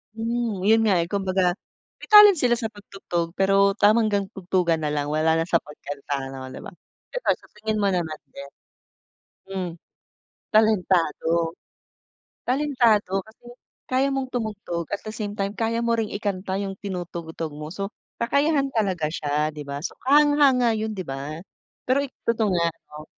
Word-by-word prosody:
Hmm, 230 -3 -2
yun 220 +4 +5
nga 190 -5 +3
eh, 170 - -4
kumbaga 190 -2 +1 0.4
may - - -11
talent 420 -3 +9
sila 250 -4 +3
sa 230 -2 -2
pag-tugtog. 195 -5 -5
Pero 195 +1 +3
tama 215 +2 +4
hanggang 200 -2 0
tugtugan 180 -4 0
nalang 145 -1 -1
wala 155 +1 +2
na - - -1
sa 170 - +5
pagkanta 145 -3 -6
no, 135 -1 -7
di - - -8
ba? - - -8 0.4
Pero - - -6
sa - - -15
tingin 215 0 -1
mo 200 - +3
naman 170 -5 -1
din 140 +1 -10 1.0
hmm 185 -2 -2 0.8
talentado 175 -6 +2 0.9
talentado 240 -8 +2
kasi 220 +3 -21 0.4
kaya 260 +2 +2
mong 270 -1 -1
tumugtog, 210 -8 -3
at 205 - 0
the - - -3
same 210 -1 -5
time 195 +1 -1
kaya 230 0 0
mo 235 - +2
ring 225 -2 -1
ikanta 195 -2 -2
yung 195 -1 -3
tinutugtog 170 -4 -5
mo 150 +1 -7
so 195 +2 -3 0.3
kakayahan 280 +4 +2
talaga 190 -8 +1
siya, 150 -1 0
di 150 - -6
ba? 140 0 -5
So - - -4
kahanga-hanga 280 -4 +5
yun 220 0 -2
di 195 -3 -5
ba? 140 +3 -5 0.5
Pero 260 +2 +3
i 280 - -5 0.2
totoo 225 -2 +2
nga 170 -2 +2 0.2
no. 150 0 -9
200 Hz, 160 wpm, -24 LUFS, 170-225 Hz, 1.0 s, talent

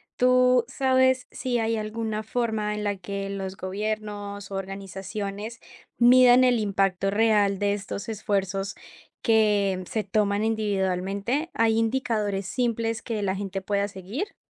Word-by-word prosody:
¿tú 250 0 +4
sabes 260 0 +2
si 250 -2 -2
hay 225 0 0
alguna 215 0 -3
forma 220 -2 -1
en 210 - -4
la 205 -1 -1
que 195 +1 -5
los 195 -1 -4
gobiernos, 205 0 -4
organizaciones, 195 +3 -5 0.4
miran 250 +1 +7
el 250 -2 +4
impacto 195 -2 +1
real 205 -2 +3
de 205 0 +1
estos 205 +1 -5
esfuerzos 195 -2 -2 0.5
que 205 -4 +3
se 220 - -1
toman 205 +1 +1
individualmente? 200 - -1
¿Hay 225 0 +2
indicadores 220 -4 0
simples 230 -2 -1
que 225 -3 -3
la 190 -1 0
gente 195 -1 -4
pueda 200 +1 0
seguir? 205 - -6
210 Hz, 130 wpm, -26 LUFS, 195-230 Hz, 0.5 s, miran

